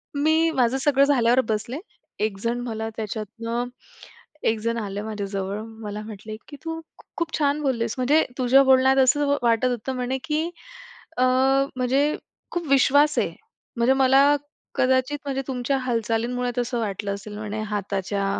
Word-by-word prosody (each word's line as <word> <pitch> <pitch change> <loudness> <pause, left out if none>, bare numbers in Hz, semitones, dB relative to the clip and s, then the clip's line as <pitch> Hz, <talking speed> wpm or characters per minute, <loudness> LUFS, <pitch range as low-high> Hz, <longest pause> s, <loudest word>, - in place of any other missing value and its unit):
मी 315 +3 +3
माझं 250 0 +2
सगळं 275 0 +3
झाल्यावर 250 -3 +4
बसले. 220 +5 -2 0.4
एक 210 -2 -1
जण 235 +1 0
मला 220 0 -3
त्याच्यातनं 230 +2 -3 0.8
एक 220 -1 +2
जण 230 +1 -1
आलं 205 -1 -4
माझ्याजवळ. 200 -1 -3 0.2
मला 210 0 -5
म्हटले, 215 0 -8
"की 290 - -10
तू 325 0 -3 0.4
खूप 335 -1 -2
छान 295 0 +1
बोललेस 235 -5 0
म्हणजे 285 +5 +3
तुझ्या 260 +2 +5
बोलण्यात 265 0 +5
असं 285 +2 +3
वाटत 230 +1 +3
होतं 245 +1 -2
म्हणे, 250 +1 -1
की 315 +2 0 0.7
अ, 255 - +3 0.5
म्हणजे 265 +4 +1 0.4
खूप 345 -3 -3
विश्वास 285 +2 +4
आहे." - - -1 0.4
म्हणजे 240 +3 +4
मला 270 0 +5 0.5
कदाचित, 260 +3 +2
म्हणजे 270 -1 -1
तुमच्या 265 +1 -1
हालचालींमुळे 240 0 -1
तसं 240 0 -1
वाटलं 200 -2 -2
असेल 205 +1 -9
म्हणे 215 0 -4
हाताच्या 200 0 -2
245 Hz, 145 wpm, -24 LUFS, 220-270 Hz, 0.8 s, तुझ्या